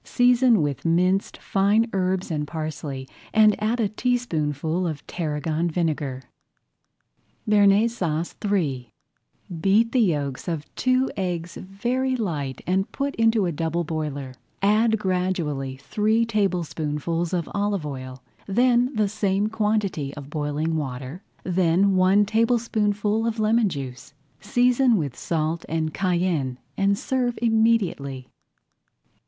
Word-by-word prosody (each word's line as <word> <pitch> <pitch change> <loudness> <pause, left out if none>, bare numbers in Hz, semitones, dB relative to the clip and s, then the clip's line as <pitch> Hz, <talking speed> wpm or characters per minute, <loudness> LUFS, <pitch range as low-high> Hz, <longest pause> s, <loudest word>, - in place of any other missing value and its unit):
Season 245 -5 +4
with 145 -2 -3
minced 180 +4 +1
fine 205 +4 +2
herbs 185 -1 -1
and 150 -2 -2
parsley 150 -4 -5 0.3
and 215 -1 +6
add 225 +3 0
a 220 - +2
teaspoonful 175 - -1
of 155 -3 -5
tarragon 160 0 -2
vinegar. 150 -6 -2 1.2
BEARNAISE 210 +2 +4
SAUCE 165 -2 -2
III 140 - -1 0.7
Beat 215 +5 +3
the 255 - +2
yolks 145 - -1
of 160 -4 -3
two 255 +1 +1
eggs 175 -3 -3
very 245 +7 -2
light 150 - -3
[Page - - -16
17] 180 - 0
and 195 +1 0
put 280 0 -2
into 225 -3 +3
a 175 - 0
double 165 +2 -1
boiler. 150 -4 -4 0.3
Add 220 +2 +3
gradually 180 -9 -2
three 215 +10 +1
tablespoonfuls 170 -6 -1
of 175 -3 -1
olive 200 -4 -1
oil, 130 -2 -7 0.2
then 245 +4 +3
the 215 -1 +2
same 205 0 0
quantity 210 -10 -1
of 145 -1 -9
boiling 155 +1 -1
water, 135 +3 -5 0.2
then 185 +2 +2
one 190 +3 +4
tablespoonful 220 -1 +1
of 230 0 -2
lemon 220 0 +3
juice. 135 -3 -7 0.2
Season 245 -1 +3
with 140 -8 -3
salt 160 0 -2
and 160 -1 -1
cayenne 175 -8 0 0.2
and 200 0 +2
serve 250 0 -1
immediately. 220 - +1
185 Hz, 125 wpm, -24 LUFS, 155-215 Hz, 1.2 s, and